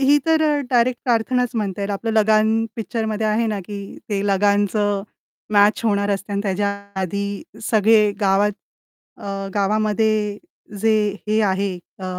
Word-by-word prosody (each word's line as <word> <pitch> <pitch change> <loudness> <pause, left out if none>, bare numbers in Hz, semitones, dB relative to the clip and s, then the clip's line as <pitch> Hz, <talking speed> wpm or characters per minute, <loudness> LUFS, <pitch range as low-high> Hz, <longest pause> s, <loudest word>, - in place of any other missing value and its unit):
ही 285 +2 +5
तर 320 -1 +3
अ, 300 -1 +2
डायरेक्ट 245 0 +2
प्रार्थनाच 245 +1 +1
म्हणता 200 -3 -2
येईल. 200 0 -2
आपलं 205 +3 -2
लगान 220 +1 +3
पिक्चरमध्ये 220 -1 -2
आहे 215 +2 +1
ना 215 -2 -2
की 205 +2 -7 0.3
ते 205 -1 -1
लगानचं 205 0 +1 0.5
मॅच 205 +1 +4
होणार 200 -2 +1
असते 200 +1 -3
आणि 200 - 0
त्याच्या 200 0 0 0.3
आधी 200 +2 -3 0.3
सगळे 215 -1 +4
गावात 200 +1 +3 0.6
अ, - - -13 0.3
गावामध्ये 210 0 +1 0.4
जे 225 +1 +3 0.4
हे 215 +1 +2
आहे 195 -1 0 0.3
अ, 190 - -7
210 Hz, 145 wpm, -21 LUFS, 200-225 Hz, 0.6 s, ही